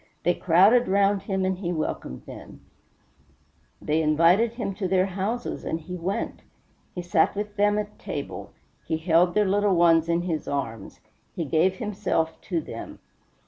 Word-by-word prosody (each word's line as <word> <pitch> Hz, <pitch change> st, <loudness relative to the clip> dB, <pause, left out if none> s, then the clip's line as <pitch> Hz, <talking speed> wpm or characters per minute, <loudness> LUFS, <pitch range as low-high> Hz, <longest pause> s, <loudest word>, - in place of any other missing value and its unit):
They 175 Hz, -, +3 dB
crowded 195 Hz, +9 st, +4 dB
round 200 Hz, +1 st, +2 dB
him 190 Hz, -1 st, -2 dB
and 185 Hz, -1 st, -1 dB
he 175 Hz, -3 st, -2 dB
welcomed 155 Hz, -, -4 dB
them; -, -, -11 dB, 1.2 s
they 155 Hz, +2 st, 0 dB
invited 170 Hz, +9 st, +3 dB
him 235 Hz, -5 st, -3 dB
to 190 Hz, 0 st, -3 dB
their 185 Hz, 0 st, +2 dB
houses 195 Hz, +5 st, -3 dB
and 160 Hz, -, -2 dB
he 180 Hz, +3 st, -7 dB
went; 180 Hz, +3 st, -3 dB, 0.5 s
he 180 Hz, -, -4 dB
sat 175 Hz, 0 st, +2 dB
with 205 Hz, 0 st, -4 dB
them 205 Hz, 0 st, +2 dB
at 210 Hz, 0 st, -5 dB
table; -, -, -6 dB, 0.4 s
he 160 Hz, -, 0 dB
held 170 Hz, +2 st, +2 dB
their 210 Hz, -1 st, +4 dB
little 200 Hz, 0 st, +2 dB
ones 165 Hz, -1 st, +4 dB
in 170 Hz, +1 st, +1 dB
his 165 Hz, -4 st, -3 dB
arms; 115 Hz, -7 st, -4 dB, 0.3 s
he 165 Hz, -, -2 dB
gave 165 Hz, +6 st, +2 dB
himself 195 Hz, -6 st, -2 dB
to 170 Hz, -4 st, 0 dB
them. -, -, -8 dB
185 Hz, 160 wpm, -25 LUFS, 165-200 Hz, 1.2 s, crowded